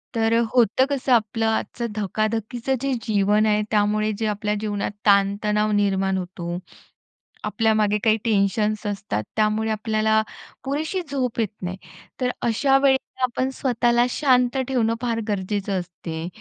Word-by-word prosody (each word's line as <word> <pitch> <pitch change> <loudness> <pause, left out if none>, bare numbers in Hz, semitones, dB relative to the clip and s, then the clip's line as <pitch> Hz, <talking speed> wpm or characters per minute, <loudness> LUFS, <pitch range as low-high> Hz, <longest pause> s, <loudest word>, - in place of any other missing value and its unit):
तर 225 0 +2 0.2
होतं 245 +1 +4
कसं 275 -2 -1
आपलं, 225 0 +1
आजचं 235 +1 -1
धकाधकीचं 220 +5 -1
जे 275 -1 0
जीवन 210 0 +2
आहे, 210 0 +2
त्यामुळे 215 0 +2
जे 225 - -1
आपल्या 210 0 -1
जीवनात 205 -2 -2
ताण-तणाव 210 +1 +3
निर्माण 195 -2 +1
होतो, 175 -1 -5 0.9
आपल्यामागे 215 -2 +2
काही 220 -1 +4
टेन्शन्स 210 0 +1
असतात, 195 - -3
त्यामुळे 215 +1 +1
आपल्याला 220 0 +1 0.4
पुरेशी 310 +7 -2
झोप 250 -4 -2
येत 220 -3 +1
नाही. 180 +1 -4 0.4
तर 250 - +2
अशा 270 +4 +3
वेळेला 265 -1 +1
आपण 255 +1 0
स्वतःला 240 -2 +2
शांत 250 -1 +2
ठेवणं, 235 -4 +1
फार 230 -2 -1
गरजेचं 200 -1 -1
असते, 170 -2 -6
215 Hz, 130 wpm, -23 LUFS, 205-240 Hz, 0.9 s, होतं